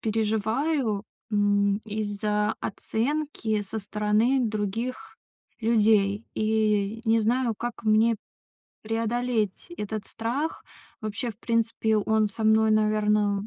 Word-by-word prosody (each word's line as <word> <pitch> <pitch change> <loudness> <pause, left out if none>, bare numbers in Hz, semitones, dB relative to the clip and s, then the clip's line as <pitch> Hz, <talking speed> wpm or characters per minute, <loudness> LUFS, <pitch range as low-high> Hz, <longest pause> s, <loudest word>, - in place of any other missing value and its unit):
переживаю, 220 +2 0 0.3
м, 205 -1 +2
из-за 210 -1 -1
оценки 230 -1 -2
со 205 +2 -5
стороны 210 +5 +1
других 220 - -3 0.4
людей. 215 -2 +3
И 215 -1 +1
не 225 0 +3
знаю, 235 +1 +1
как 240 0 -5
мне 220 +1 +4 0.7
преодолеть 225 - -1
этот 210 -1 -4
страх. 260 +8 -3 0.4
Вообще, 220 +3 -3
в 215 - -14
принципе, 230 -1 +1
он 215 0 +2
со 220 +2 -5
мной, 220 0 +4
наверно, 210 -1 +2
220 Hz, 105 wpm, -26 LUFS, 210-230 Hz, 0.7 s, мне